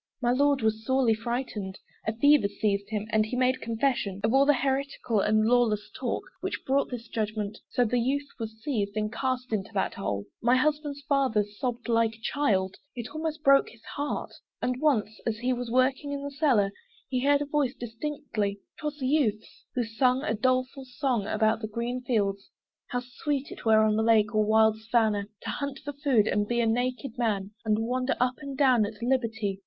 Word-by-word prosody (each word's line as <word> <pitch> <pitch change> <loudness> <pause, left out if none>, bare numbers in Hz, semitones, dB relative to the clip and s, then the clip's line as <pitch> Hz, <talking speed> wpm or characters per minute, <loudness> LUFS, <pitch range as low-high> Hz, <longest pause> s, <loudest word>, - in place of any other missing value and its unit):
My 240 -2 +2
Lord 280 0 +3
was 220 0 +1
sorely 260 -2 +3
frightened; 225 -4 -4 0.3
A 220 - +1
fever 285 -2 +5
seized 200 -1 -1
him, 215 -1 -2
and 220 -1 +4
he 220 +4 -4
made 255 +1 +2
confession 225 -4 -1
Of 220 +2 +2
all 275 +1 +5
the 290 - +6
heretical 265 -3 0
and 215 +2 +3
lawless 230 -3 +2
talk - - -2 0.2
Which - - -4
brought 275 +1 +1
this 240 -2 -6
judgment: 215 -2 -3
so 245 - +2
the 245 +2 +1
youth 280 +4 0
was 220 -1 -6
seized 215 -7 -1
And 215 0 -1
cast 255 -2 -2
into 205 -1 -1
that 190 - 0
hole. 100 - -3 0.2
My 240 +2 +4
husband's 295 +1 0
father 270 -6 +2
Sobbed 235 +4 -4
like 230 -1 +2
a - - -20
child 200 -8 0 0.2
it 240 +2 -6
almost 310 0 -3
broke 275 -1 +5
his 225 -1 -18
heart: 290 +1 -3 0.3
And 250 0 -2
once 220 -8 +1
as 220 -1 0
he 250 +3 0
was 245 -1 -4
working 260 +4 +1
in 280 0 -4
the 285 - -4
cellar, 265 -9 +2 0.4
He 255 -1 -1
heard 285 +1 +4
a - - -5
voice 285 -3 0
distinctly; 230 -4 -3 0.2
'twas 300 -1 -3
the 260 -3 -2
youth's, 230 -7 0
Who 250 - +1
sung 250 +4 +1
a 220 - 0
doleful 255 +4 0
song 250 -5 -1
about 220 +1 +1
green 240 +3 -2
fields, 200 -6 -1 0.4
How 245 - -2
sweet 270 +3 -3
it - - -10
were 220 -1 +6
on 215 -1 +3
lake 220 -1 +3
or 215 0 +3
wild 220 0 +3
savannah, 220 -3 +1 0.2
To - - -4
hunt 280 -1 -4
for 290 - -4
food, 275 -7 +2
and 205 -1 +1
be 240 +1 0
a 235 - +3
naked 245 +2 -1
man, 205 -4 0
And 220 0 +1
wander 255 +2 0
up 250 +1 +2
and 280 -2 -6
down 255 -6 +4
at 210 0 -10
liberty. 225 -6 0
240 Hz, 195 wpm, -28 LUFS, 215-270 Hz, 0.4 s, the